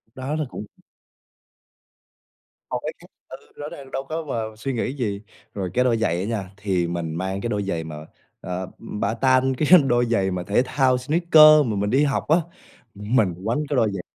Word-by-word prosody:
Đó 135 Hz, +4 st, -3 dB
là 155 Hz, -2 st, -1 dB
cũng 105 Hz, -, -7 dB, 2.1 s
Một -, -, -1 dB
cái -, -, -4 dB
khác -, -, -16 dB, 0.2 s
ừ, -, -, -8 dB, 0.2 s
rõ 145 Hz, -, -7 dB
ràng 135 Hz, -2 st, -11 dB
đâu 135 Hz, -, -3 dB
có 160 Hz, +1 st, -3 dB
vào 110 Hz, -6 st, -4 dB
suy 135 Hz, +4 st, -4 dB
nghĩ 125 Hz, +3 st, -2 dB
gì. 105 Hz, -7 st, -3 dB, 0.3 s
Rồi 95 Hz, -3 st, -3 dB
cái 125 Hz, -, +3 dB
đôi 120 Hz, -2 st, +2 dB
giày 95 Hz, -7 st, 0 dB
á -, -, -2 dB
nha, 105 Hz, -4 st, -3 dB
thì 95 Hz, -4 st, -1 dB
mình 85 Hz, -2 st, -4 dB
mang 95 Hz, +2 st, -3 dB
cái 120 Hz, -, -3 dB
đôi 105 Hz, -2 st, -1 dB
giày 85 Hz, -4 st, -3 dB
mà, 80 Hz, -1 st, -8 dB, 0.5 s
ờ, 90 Hz, 0 st, -4 dB, 0.2 s
ừm, 105 Hz, -, -7 dB
bata, 130 Hz, +4 st, +2 dB, 0.2 s
cái 170 Hz, +4 st, +7 dB
đôi 120 Hz, -1 st, +2 dB
giày 100 Hz, -5 st, 0 dB
mà 90 Hz, -1 st, -3 dB
thể 100 Hz, +6 st, +2 dB
thao 130 Hz, -1 st, +2 dB
sneaker 155 Hz, +1 st, +6 dB
mà 110 Hz, -, -2 dB
mình 100 Hz, +1 st, -1 dB
đi 135 Hz, +6 st, +3 dB
học 140 Hz, -2 st, -1 dB
á. 160 Hz, +3 st, +5 dB, 0.6 s
Mình 105 Hz, -2 st, +1 dB
quánh 115 Hz, +6 st, 0 dB
cái 145 Hz, -, 0 dB
đôi 110 Hz, -5 st, +2 dB
giày 95 Hz, -, -4 dB
115 Hz, 205 wpm, -23 LUFS, 100-135 Hz, 2.1 s, cái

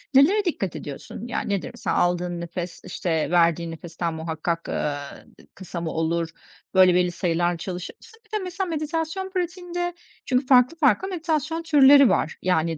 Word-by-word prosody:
nelere 380 Hz, +10 st, +5 dB
dikkat 195 Hz, -, -2 dB
ediyorsun? 150 Hz, -, -7 dB
Ya, -, -, -2 dB
nedir 200 Hz, -5 st, -2 dB
mesela -, -, -2 dB
aldığın 175 Hz, 0 st, 0 dB
nefes, 170 Hz, 0 st, -6 dB
işte, 165 Hz, -2 st, -1 dB
verdiğin 170 Hz, -1 st, +3 dB
nefesten 165 Hz, +1 st, -4 dB
muhakkak, 160 Hz, +1 st, -3 dB
ııı, 145 Hz, -1 st, -1 dB, 0.4 s
d -, -, -18 dB
kısa 180 Hz, -2 st, -6 dB
mı 165 Hz, -, -3 dB
olur? 165 Hz, +1 st, -1 dB, 0.4 s
Böyle, 185 Hz, -1 st, +6 dB
belli 180 Hz, -1 st, +2 dB
sayılarla 175 Hz, 0 st, 0 dB
çalışır 180 Hz, +1 st, -6 dB
mısın? 455 Hz, 0 st, -18 dB
Bir -, -, -30 dB
de -, -, -6 dB
mesela 370 Hz, +1 st, -3 dB
meditasyon 325 Hz, +4 st, -2 dB
pratiğinde 355 Hz, -1 st, -3 dB, 0.3 s
çünkü 255 Hz, +1 st, +1 dB
farklı 255 Hz, +5 st, +5 dB
farklı 310 Hz, +5 st, +3 dB
meditasyon 325 Hz, -2 st, -2 dB
türleri 280 Hz, -5 st, +7 dB
var 160 Hz, -, 0 dB
yani 165 Hz, -3 st, +1 dB
185 Hz, 160 wpm, -24 LUFS, -, 0.4 s, türleri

